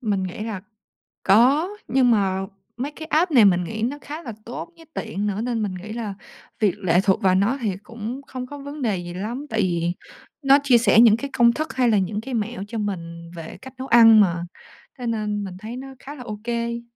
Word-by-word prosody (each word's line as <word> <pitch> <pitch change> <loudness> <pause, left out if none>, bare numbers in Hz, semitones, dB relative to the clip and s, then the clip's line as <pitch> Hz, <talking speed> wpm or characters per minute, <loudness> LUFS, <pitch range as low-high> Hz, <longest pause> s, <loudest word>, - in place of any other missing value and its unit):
Mình 205 -6 0
nghĩ 185 -1 -5
là 215 -4 -4 0.6
có, 260 - +5 0.2
nhưng 255 -2 +3
mà 195 -3 +1 0.3
mấy 270 +4 -3
cái 315 +1 -9
app 325 +3 +2
này 235 -7 +7
mình 180 -2 +4
nghĩ 220 +5 -5
nó 255 +5 -1
khá 305 +3 -7
là 235 - -6
tốt, 245 +7 -6
với 330 -1 -16
tiện 210 -2 -3
nữa, 205 +1 -2
nên 235 -1 -1
mình 195 -3 -2
nghĩ 210 +4 -7
là 225 -4 -4 0.5
việc 205 -4 +2
lệ 180 -3 +3
thuộc 190 -2 +2
vào 185 -1 +4
nó 210 +8 +2
thì 205 -5 -1
cũng 230 +5 -6
không 255 -1 -6
có 290 +2 -8
vấn 285 +1 -8
đề 215 -6 0
gì 175 0 -6
lắm. 230 +10 -4
Tại 220 -3 0
vì 175 -2 0 0.5
nó 275 0 +6
chia 260 -4 +5
sẻ 230 -1 +4
những 230 -2 +7
cái 280 +3 -5
công 235 -1 +5
thức, 310 +1 -3
hay 250 -2 +2
là 215 - +4
những 205 +2 -1
cái 265 +2 -7
mẹo 225 -2 -2
cho 230 - -5
mình 170 -5 -5
về 165 -1 -8
cách 265 0 -11
nấu 260 +1 -6
ăn 225 -2 +8
mà, 175 -4 +2 0.6
thế 245 - -4
nên 210 -2 -1
mình 185 -2 -7
thấy 225 +4 -7
nó 270 +1 -7
khá 290 +2 -9
là 250 - -9
ô 210 -3 -6
kê. 235 0 -2
225 Hz, 235 wpm, -23 LUFS, 195-250 Hz, 0.6 s, ăn